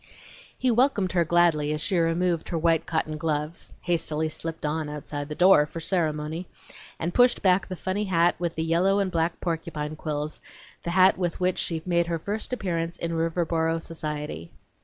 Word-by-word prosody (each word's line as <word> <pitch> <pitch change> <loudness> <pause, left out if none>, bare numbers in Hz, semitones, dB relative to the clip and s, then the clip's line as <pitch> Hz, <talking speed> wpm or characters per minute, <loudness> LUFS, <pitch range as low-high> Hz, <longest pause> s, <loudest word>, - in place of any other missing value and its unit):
He 255 - +2
welcomed 230 -6 +2
her 175 -1 +3
gladly 165 -3 +3
as 150 - -2
she 170 +5 0
removed 170 0 +1
her 170 - -1
white 165 0 +2
cotton 155 -2 -2
gloves 155 +1 -2
(hastily 160 -2 0
slipped 165 0 -5
on 150 0 -1
outside 145 0 -5
the 150 - -4
door, 175 -4 +6
for 165 - -7
ceremony) 160 -1 -1 0.5
and 170 +2 -3
pushed 245 0 +4
back 185 0 +3
the 185 - -5
funny 190 +4 -2
hat 175 -2 +3
with 170 -1 -2
the 160 - -1
yellow 175 +4 +2
and 195 -2 0
black 165 0 0
porcupine 160 -3 -3
quills 150 -1 -4 0.4
the - - -4
hat 185 +2 +5
with 175 -2 -1
which 185 0 +1
she 160 -2 -2
made 170 -1 +2
her 170 -1 -1
first 205 +9 -4
appearance 170 -7 -2
in 170 - -3
Riverboro 165 0 0
society. 150 - -5
165 Hz, 180 wpm, -26 LUFS, 155-180 Hz, 0.5 s, door